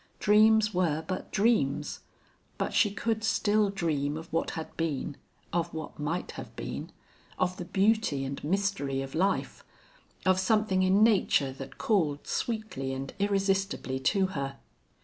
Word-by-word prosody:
Dreams 215 Hz, 0 st, +5 dB
were 160 Hz, -4 st, +1 dB
but 185 Hz, 0 st, -4 dB
dreams. 190 Hz, -, +1 dB, 0.6 s
But -, -, -2 dB
she 210 Hz, -, +4 dB
could 220 Hz, +2 st, -2 dB
still 210 Hz, -1 st, +2 dB
dream 155 Hz, -6 st, -1 dB
of 160 Hz, +1 st, -10 dB
what 165 Hz, -, +1 dB
had 160 Hz, -, -6 dB
been, 150 Hz, -2 st, -2 dB, 0.4 s
of 170 Hz, 0 st, 0 dB
what 160 Hz, -1 st, -7 dB
might 160 Hz, +4 st, -2 dB
have -, -, -9 dB
been, -, -, -5 dB, 0.5 s
of 185 Hz, 0 st, 0 dB
the 180 Hz, -, -5 dB
beauty 195 Hz, -8 st, +2 dB
and 140 Hz, +1 st, -5 dB
mystery 155 Hz, -6 st, 0 dB
of 135 Hz, -, -8 dB
life, 190 Hz, +4 st, 0 dB, 0.6 s
of 185 Hz, 0 st, +4 dB
something 195 Hz, -1 st, +2 dB
in 190 Hz, +3 st, +4 dB
nature 190 Hz, -10 st, +3 dB
that 135 Hz, 0 st, -9 dB
called 160 Hz, -10 st, +1 dB
sweetly 215 Hz, -, -3 dB
and 135 Hz, 0 st, -5 dB
irresistibly 195 Hz, -8 st, 0 dB
to 190 Hz, +8 st, +2 dB
her. 140 Hz, -1 st, -3 dB
185 Hz, 145 wpm, -29 LUFS, 145-205 Hz, 0.6 s, Dreams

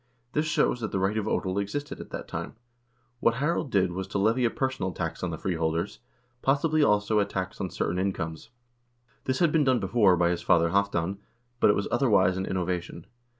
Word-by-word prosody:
This 150 Hz, +1 st, +1 dB
shows 140 Hz, -5 st, +1 dB
that 110 Hz, -, -3 dB
the -, -, -1 dB
right 95 Hz, +3 st, +1 dB
of 110 Hz, -1 st, -1 dB
odel 95 Hz, -2 st, 0 dB
existed 145 Hz, +8 st, -5 dB
at -, -, -9 dB
that -, -, -6 dB
time. -, -, -5 dB, 0.6 s
What 115 Hz, -1 st, +3 dB
Harald 145 Hz, +2 st, 0 dB
did 95 Hz, -5 st, +2 dB
was 95 Hz, +2 st, -4 dB
to 100 Hz, -, -3 dB
levy 110 Hz, +5 st, +2 dB
a -, -, +3 dB
personal 130 Hz, -9 st, -2 dB
tax 85 Hz, -2 st, -4 dB
on 90 Hz, -, -1 dB
the 80 Hz, -, -4 dB
freeholders, 80 Hz, -6 st, -2 dB, 0.4 s
possibly, 150 Hz, +3 st, +2 dB
also, 105 Hz, -4 st, +3 dB
a 100 Hz, -, +3 dB
tax 95 Hz, -2 st, -4 dB
on 95 Hz, -, -2 dB
certain 85 Hz, +1 st, -2 dB
incomes. 90 Hz, -2 st, -3 dB, 0.8 s
This 130 Hz, 0 st, 0 dB
had 170 Hz, -3 st, +3 dB
been 155 Hz, -1 st, +3 dB
done 130 Hz, -3 st, +3 dB
before 100 Hz, -7 st, +3 dB
by 85 Hz, 0 st, +3 dB
his 85 Hz, -, -2 dB
father 85 Hz, -1 st, +3 dB
Halvdan, 100 Hz, -1 st, 0 dB, 0.4 s
but -, -, +5 dB
it 105 Hz, -, +5 dB
was 100 Hz, -, -1 dB
otherwise 105 Hz, -8 st, +3 dB
an 95 Hz, 0 st, -3 dB
innovation. 90 Hz, -2 st, -3 dB
100 Hz, 200 wpm, -27 LUFS, 90-125 Hz, 0.8 s, but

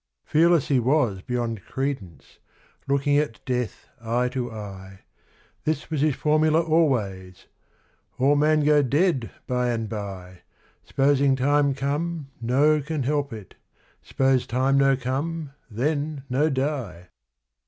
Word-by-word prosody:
Fearless 165 Hz, -1 st, +3 dB
he 135 Hz, -3 st, +3 dB
was 120 Hz, -6 st, +1 dB
beyond 115 Hz, -3 st, -3 dB
credence, 130 Hz, -, -5 dB, 0.5 s
looking 140 Hz, +1 st, +2 dB
at 150 Hz, -7 st, -3 dB
death 125 Hz, -2 st, -3 dB, 0.2 s
eye 120 Hz, +2 st, 0 dB
to 125 Hz, -1 st, -3 dB
eye: 95 Hz, -3 st, -9 dB, 0.6 s
This 155 Hz, 0 st, -2 dB
was 155 Hz, -3 st, -1 dB
his 150 Hz, -3 st, +2 dB
formula 155 Hz, +1 st, +2 dB
always, 110 Hz, -, 0 dB, 0.7 s
'All 140 Hz, +3 st, +3 dB
man 155 Hz, +1 st, +3 dB
go 150 Hz, 0 st, +5 dB
dead 140 Hz, -1 st, +1 dB, 0.2 s
by 125 Hz, -1 st, 0 dB
and 115 Hz, -2 st, -2 dB
bye 95 Hz, -4 st, -7 dB, 0.5 s
S'posing 135 Hz, -1 st, +3 dB
time 140 Hz, +1 st, +2 dB
come 145 Hz, +2 st, -3 dB
no 145 Hz, +6 st, +3 dB
can 150 Hz, -1 st, -3 dB
help 145 Hz, +1 st, -1 dB
it 105 Hz, -4 st, -9 dB, 0.5 s
s'pose 130 Hz, -2 st, +1 dB
time 130 Hz, +3 st, +1 dB
no 135 Hz, -1 st, +4 dB
come, 140 Hz, +4 st, -3 dB, 0.2 s
then 145 Hz, +5 st, -2 dB
no 145 Hz, +5 st, +2 dB
die.' 130 Hz, -, -3 dB
135 Hz, 125 wpm, -24 LUFS, 115-150 Hz, 0.7 s, go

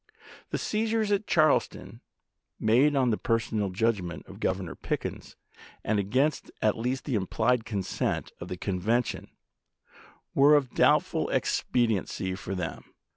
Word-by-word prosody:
The -, -, -1 dB
seizures 220 Hz, 0 st, 0 dB
at 205 Hz, +1 st, +1 dB
Charleston, 155 Hz, -2 st, +1 dB, 0.6 s
made 130 Hz, +7 st, +4 dB
on 130 Hz, -3 st, +3 dB
the 105 Hz, -, -1 dB
per 115 Hz, -, +2 dB
sonal 105 Hz, -3 st, -2 dB
judgment 95 Hz, -4 st, -1 dB
of -, -, -12 dB
Governor -, -, -2 dB
Pickens, -, -, -5 dB, 0.5 s
and 110 Hz, -1 st, +1 dB
against 130 Hz, +9 st, 0 dB
at 110 Hz, -, +2 dB
least 125 Hz, +3 st, -2 dB
the 135 Hz, -, -2 dB
implied 115 Hz, +4 st, +1 dB
consent 100 Hz, -5 st, -2 dB
of -, -, -7 dB
the 90 Hz, -, -5 dB
convention, 105 Hz, +6 st, -1 dB, 1.0 s
were 145 Hz, +2 st, +6 dB
of 135 Hz, -4 st, +1 dB
doubtful -, -, +3 dB
expediency 110 Hz, -5 st, 0 dB
for 95 Hz, +1 st, -5 dB
them. 90 Hz, -3 st, -6 dB
115 Hz, 130 wpm, -28 LUFS, 100-135 Hz, 1.0 s, were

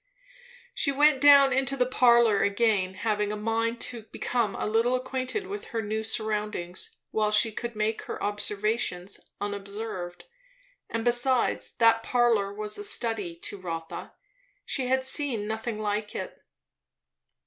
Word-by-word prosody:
She 280 Hz, -, +1 dB
went 290 Hz, -1 st, +4 dB
down 280 Hz, -1 st, +8 dB
to 275 Hz, +1 st, 0 dB
the 250 Hz, -, +3 dB
parlour 235 Hz, -4 st, +4 dB
again, 200 Hz, -3 st, +1 dB
having 210 Hz, 0 st, -1 dB
a -, -, -2 dB
mind 225 Hz, +2 st, -1 dB
to 240 Hz, -2 st, -3 dB
become 230 Hz, -2 st, -1 dB
a -, -, -3 dB
little 230 Hz, +4 st, +2 dB
acquainted 260 Hz, +9 st, -3 dB
with 405 Hz, +1 st, -6 dB
her 230 Hz, -2 st, -3 dB
new 215 Hz, +1 st, -2 dB
surroundings 210 Hz, -5 st, -3 dB
while 215 Hz, -1 st, +1 dB
she 215 Hz, +2 st, +4 dB
could 235 Hz, +2 st, -5 dB
make 215 Hz, +1 st, -1 dB
her -, -, -5 dB
observations 205 Hz, -2 st, -2 dB, 0.2 s
unobserved; 200 Hz, -2 st, -5 dB, 0.7 s
and 230 Hz, 0 st, -3 dB
besides, 245 Hz, +1 st, +1 dB
that 225 Hz, -1 st, +4 dB
parlour 230 Hz, -5 st, +2 dB
was 210 Hz, -, -2 dB
a -, -, -5 dB
study 225 Hz, -, -1 dB
to 205 Hz, -, -7 dB
Rotha; 165 Hz, -3 st, -6 dB, 0.5 s
she 260 Hz, -3 st, -2 dB
had 260 Hz, +1 st, +2 dB
seen 260 Hz, -5 st, 0 dB
nothing 220 Hz, 0 st, -3 dB
like 210 Hz, 0 st, -2 dB
it. -, -, -5 dB
225 Hz, 140 wpm, -27 LUFS, 205-245 Hz, 0.7 s, down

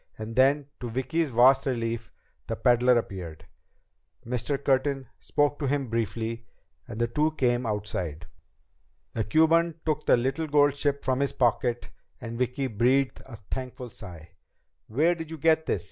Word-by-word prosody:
And 110 Hz, +1 st, -6 dB
then, 140 Hz, +2 st, +4 dB
to 120 Hz, -, -5 dB
Vicki's 145 Hz, +7 st, -1 dB
vast 130 Hz, +3 st, +5 dB
relief, 115 Hz, -3 st, -2 dB, 0.4 s
the -, -, -2 dB
peddler 125 Hz, 0 st, +4 dB
appeared. 85 Hz, -8 st, -5 dB, 0.8 s
Mr. 125 Hz, +4 st, -1 dB
Curtin 135 Hz, 0 st, 0 dB
spoke 145 Hz, 0 st, 0 dB
to 145 Hz, -, -1 dB
him 135 Hz, -2 st, -1 dB
briefly, 115 Hz, 0 st, -3 dB, 0.4 s
and 115 Hz, -1 st, -7 dB
the 120 Hz, -, +3 dB
two 150 Hz, +6 st, +1 dB
came 120 Hz, -4 st, +1 dB
outside. 90 Hz, -6 st, -3 dB, 0.9 s
The 110 Hz, -, -1 dB
Cuban 160 Hz, +7 st, +3 dB
took 155 Hz, -1 st, -1 dB
the -, -, +6 dB
little 135 Hz, +6 st, -1 dB
gold 145 Hz, -1 st, +4 dB
ship 145 Hz, -1 st, -1 dB
from 130 Hz, 0 st, +1 dB
his 140 Hz, -1 st, 0 dB
pocket 120 Hz, -1 st, 0 dB, 0.3 s
and 115 Hz, -1 st, -6 dB
Vicki 125 Hz, +2 st, -1 dB
breathed 130 Hz, +3 st, +1 dB
a 130 Hz, -, -9 dB
thankful 125 Hz, +3 st, -7 dB
sigh. 85 Hz, -6 st, -11 dB, 0.6 s
"Where 155 Hz, +10 st, +2 dB
did 165 Hz, -2 st, -7 dB
you 160 Hz, -, -6 dB
get 160 Hz, +1 st, +2 dB
this?" -, -, +1 dB
125 Hz, 155 wpm, -27 LUFS, 115-145 Hz, 0.9 s, the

